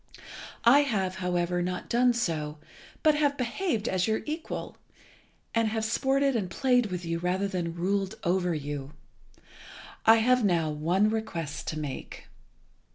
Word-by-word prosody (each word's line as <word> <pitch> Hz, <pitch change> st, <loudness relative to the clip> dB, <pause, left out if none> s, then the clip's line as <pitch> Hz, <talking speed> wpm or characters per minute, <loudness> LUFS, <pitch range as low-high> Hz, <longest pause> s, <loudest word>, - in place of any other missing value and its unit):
I 255 Hz, +5 st, +8 dB
have, 195 Hz, -10 st, 0 dB
however, 180 Hz, -1 st, 0 dB
not 180 Hz, 0 st, -3 dB
done 245 Hz, +1 st, +3 dB
so, 160 Hz, -9 st, -2 dB, 0.5 s
but 310 Hz, -, +6 dB
have 290 Hz, -1 st, +1 dB
behaved 245 Hz, -, -1 dB
as 185 Hz, +1 st, +1 dB
your 220 Hz, 0 st, 0 dB
equal, 315 Hz, +2 st, -5 dB, 0.8 s
and 230 Hz, -1 st, +2 dB
have 220 Hz, 0 st, -1 dB
sported 270 Hz, +4 st, +1 dB
and 200 Hz, -6 st, -1 dB
played 250 Hz, +1 st, +2 dB
with 180 Hz, -2 st, -5 dB
you 165 Hz, 0 st, -2 dB
rather 185 Hz, +3 st, 0 dB
than 175 Hz, -4 st, -3 dB
ruled 195 Hz, +2 st, -1 dB
over 180 Hz, -1 st, +1 dB
you. 145 Hz, -1 st, -5 dB, 1.1 s
I 225 Hz, -, +8 dB
have 250 Hz, +2 st, +3 dB
now 170 Hz, -6 st, +2 dB
one 175 Hz, +8 st, +1 dB
request 170 Hz, -9 st, -4 dB
to 155 Hz, -, -3 dB
make. 145 Hz, -3 st, -7 dB
195 Hz, 145 wpm, -28 LUFS, 175-235 Hz, 1.1 s, I